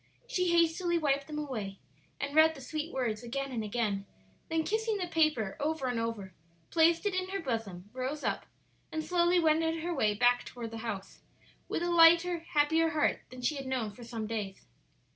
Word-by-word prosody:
She 365 -8 0
hastily 340 +1 +3
wiped 280 -3 +1
them 305 -1 -5
away 220 -10 -4 0.4
and 280 +1 -3
read 320 +1 +6
the - - -10
sweet 310 +4 -4
words 235 -5 -1
again 275 +3 -4
and 230 -3 -2
again; 205 -2 -1 0.4
then 325 0 +1
kissing 440 +3 0
the 370 - -2
paper 310 - +1
over 300 -1 -1
and 245 -2 0
over, 225 -5 -4 0.4
placed 335 +2 +4
it 410 - +1
in 370 0 -1
her 390 +1 -2
bosom, 225 - -4
rose 260 +4 -3
up, - - -2 0.4
and 315 0 -2
slowly 350 +2 +3
wended 320 0 +2
her 350 0 -1
way 215 -9 +2
back 245 +2 +3
toward 235 -2 -7
the 225 - -6
house, 205 -4 -6 0.5
with 340 - -1
a 350 - 0
lighter, 340 +1 +6
happier 325 0 +2
heart 310 -2 +1
than 255 0 -10
she 295 +4 +1
had 270 -1 -6
known 250 -5 -1
for 240 +4 -12
some 230 -2 -5
days. 210 -3 -5
290 Hz, 190 wpm, -31 LUFS, 230-330 Hz, 0.5 s, read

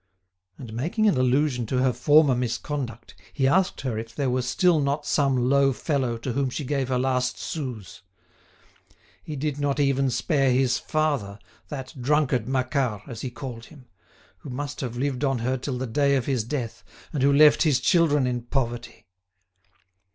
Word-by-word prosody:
And 120 -4 -9
making 170 - 0
an 205 - +3
allusion 130 -1 +1
to 130 - -1
her 130 0 +2
former 145 +3 +4
misconduct 120 -1 -4 0.2
he 135 -2 +1
asked 185 +6 +2
her 120 -5 -2
if 115 0 -9
there 135 -3 0
were 130 +1 +1
still 160 +7 +2
not 140 +1 -1
some 135 -4 +1
low 140 0 +4
fellow 130 -5 -1
to 120 +2 -4
whom 135 0 0
she 140 +3 -5
gave 135 -1 -1
her 130 - +1
last 125 -1 0
sous? 125 - -6 1.2
He 155 - -7
did 145 0 -3
not 145 0 0
even 135 -1 +2
spare 135 +3 +1
his 130 -1 +2
father, 145 -11 -1 0.3
that 135 -3 -7
drunkard 135 -4 +1
Macquart, 130 -4 -1
as 115 -3 -7
he 130 - -3
called 120 -2 -8
him, 140 -5 -16 0.5
who - - -10
must 145 +3 -5
have 120 -3 -4
lived 135 +1 -2
on 135 -2 +1
her 125 +3 -1
till 130 0 -4
the 130 - -3
day 140 +4 +2
of 130 -3 0
his 130 -5 0
death, 120 -2 -5 0.3
and 145 - -1
who 140 +1 +4
left 150 +1 +6
his 145 -6 +3
children 150 +1 +3
in 125 -1 -1
poverty. 120 -1 -4
130 Hz, 175 wpm, -25 LUFS, 125-145 Hz, 1.2 s, left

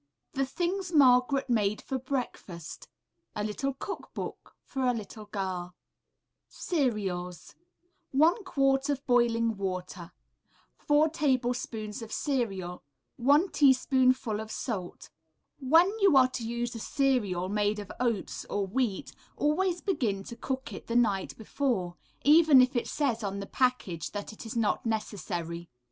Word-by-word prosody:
THE 270 0 0
THINGS 355 +5 -2
MARGARET 270 -1 +5
MADE 215 -4 +1
FOR 265 -1 -4
BREAKFAST 245 - -5 0.5
A 210 - -2
LITTLE 260 +6 -2
COOK 400 +8 -7
BOOK - - -7
FOR 265 -2 -2
A 250 - +3
LITTLE 215 -1 -7
GIRL 185 -3 -4 0.7
CEREALS 195 - -2 0.6
1 325 - +3
quart 275 -5 +1
of 280 -1 -2
boiling 230 -3 +2
water. 185 -2 -5 0.7
4 295 +1 +3
tablespoonfuls 245 -7 -1
of 225 - -8
cereal. 195 -11 -2 0.4
1 290 +9 +4
teaspoonful 255 -4 +3
of 220 0 -6
salt. 205 -6 -5 0.5
When 325 +8 +4
you 390 -8 +5
are 255 -1 +6
to 235 -3 -5
use 240 +1 -2
a 230 - -6
cereal 215 -10 0
made 210 +1 0
of 205 -2 -7
oats 235 -5 -1
or 200 -1 -2
wheat, 210 0 -2 0.3
always 350 +4 +1
begin 220 - -1
to 235 - -8
cook 265 +2 -4
it - - -9
the 230 - -3
night 205 -6 +1
before, 220 -6 -2 0.3
even 305 -1 +7
if 255 +1 +4
it 240 - 0
says 245 -7 -1
on 200 0 -3
the 200 - -5
package 205 -10 -1
that 205 +1 -5
it 220 - -10
is 225 - -6
not 225 -3 +1
necessary. 175 -6 -4
240 Hz, 140 wpm, -29 LUFS, 205-275 Hz, 0.7 s, even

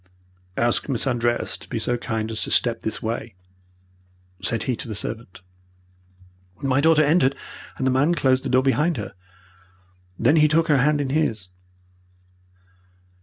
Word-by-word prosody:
"'Ask 120 +4 +1
Miss 130 -2 -1
Andreas 120 -2 0
to - - -14
be 120 - -3
so 120 +2 -1
kind 110 -2 -3
as 110 - -3
to - - -1
step 120 -2 +1
this 110 - -4
way,' 115 -1 -4 1.1
said 115 - -1
he 130 - -1
to - - -4
the 110 - -5
servant. 110 -2 -6 1.2
"My 135 0 +1
daughter 160 0 +5
entered, 145 -3 +3 0.4
and 130 - -2
the 130 - +3
man 145 +7 +2
closed 130 -4 +2
the 135 - -3
door 130 +1 +3
behind 150 +4 +1
her. 105 - -6 1.0
Then 140 +8 +3
he 155 -1 +6
took 165 +2 +2
her 145 -2 +4
hand 145 +3 +2
in 135 -2 -2
his. 110 -11 -1
130 Hz, 160 wpm, -23 LUFS, 115-145 Hz, 1.2 s, he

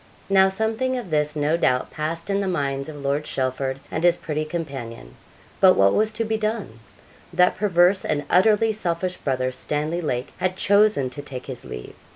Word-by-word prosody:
Now 190 -1 +5
something 220 +6 -1
of 230 -9 -6
this, 150 0 0
no 150 +2 +1
doubt, 125 -6 +1
passed 165 +4 -4
in 200 - +1
the 195 - -2
minds 140 -5 -2
of 145 -2 -9
Lord 140 +2 0
Chelford 130 0 -2
and 160 - -2
his 175 -1 +4
pretty 155 0 -3
companion. 135 - -6 0.5
But 185 -1 +7
what 100 0 +4
was 215 +1 +2
to 225 +2 -2
be 220 0 0
done? 215 - -3 0.5
That 180 +1 +4
perverse 185 -1 +3
and 145 -1 -1
utterly 215 +4 +4
selfish 185 -3 -2
brother, 130 -2 -1
Stanley 150 +6 -2
Lake, 125 -5 -3
had 185 0 -1
chosen 200 -11 +3
to 145 - -6
take 130 -3 -7
his 130 -3 -7
leave. 60 -1 -8
165 Hz, 185 wpm, -23 LUFS, 140-195 Hz, 0.5 s, But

